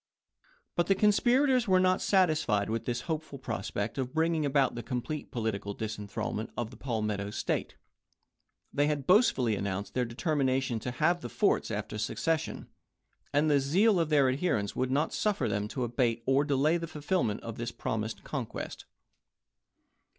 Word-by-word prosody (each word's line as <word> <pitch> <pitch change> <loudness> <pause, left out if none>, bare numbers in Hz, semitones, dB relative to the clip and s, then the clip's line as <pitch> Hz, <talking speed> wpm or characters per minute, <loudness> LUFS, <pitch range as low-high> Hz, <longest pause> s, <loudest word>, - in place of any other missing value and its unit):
But 175 0 +1
the 195 - +4
conspirators 245 +5 +3
were 185 -1 +5
not 185 0 +3
satisfied 155 - +2
with 115 0 -2
this 120 0 -2
hopeful 155 -1 -4
prospect 110 -1 -3
of 130 +2 -3
bringing 160 -2 +2
about 140 -1 +2
the 120 - -5
complete 125 +6 -4
political 100 -4 -3
disenthralment 105 0 -4
of 120 -1 -3
the - - -11
Palmetto 105 -5 -2
State. - - -2 1.0
They 145 +1 +2
had 145 -3 -1
boastfully 140 - +4
announced 100 0 -3
their 125 - +1
determination 130 -1 0
to 125 - -4
have 165 +7 +1
the 120 - -6
forts - - +1
after 105 - -4
secession, 160 +8 -1 0.6
and 145 +2 +3
the 145 -2 +4
zeal 185 +9 +3
of 165 -2 +1
their 145 -3 +4
adherents 130 - 0
would 130 0 0
not 145 +4 +1
suffer 210 -2 0
them 105 0 -1
to 125 +4 -3
abate 120 -1 0
or 135 +2 +3
delay 145 +3 +2
the 165 -1 -5
fulfillment 150 - -1
of 115 -1 -7
this 120 0 -3
promised 110 -1 -3
conquest. 130 -7 -5
130 Hz, 160 wpm, -30 LUFS, 115-160 Hz, 1.0 s, were